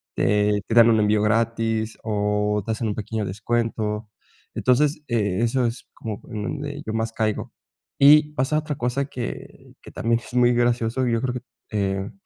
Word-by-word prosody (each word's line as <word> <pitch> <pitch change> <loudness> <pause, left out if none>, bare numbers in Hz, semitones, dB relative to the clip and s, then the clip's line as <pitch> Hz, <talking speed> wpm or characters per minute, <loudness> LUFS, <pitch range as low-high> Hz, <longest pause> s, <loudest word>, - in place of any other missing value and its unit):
Te 105 0 +2
te 115 - -1
dan 115 -1 +8
un 110 - +3
envío 105 0 +3
gratis 115 0 0
o 105 -1 0
te 110 - -2
hacen 110 +1 -2
un 105 - -2
pequeño 110 0 -3
descuento. 105 +1 -2 0.4
Entonces, 145 +4 +2
eh, 105 -5 0
eso 120 +2 +1
es 115 +1 -4
como 110 -3 -6
en 105 -1 -4
donde 145 +3 -5
yo 110 - -3
más 115 0 -1
caigo. 110 -2 -2 0.5
Y 150 +2 +7
pasa 135 +3 +1
otra 155 -1 -4
cosa 125 +3 -1
que 125 -3 -8
que - - -13
también 115 +1 0
es - - -13
muy 125 0 +5
gracioso. 120 +1 +1
Y 120 - +1
yo 115 - +1
creo 125 -2 -1
que, 125 - -4 0.3
eh, 95 -1 -1
115 Hz, 180 wpm, -23 LUFS, 105-125 Hz, 0.5 s, dan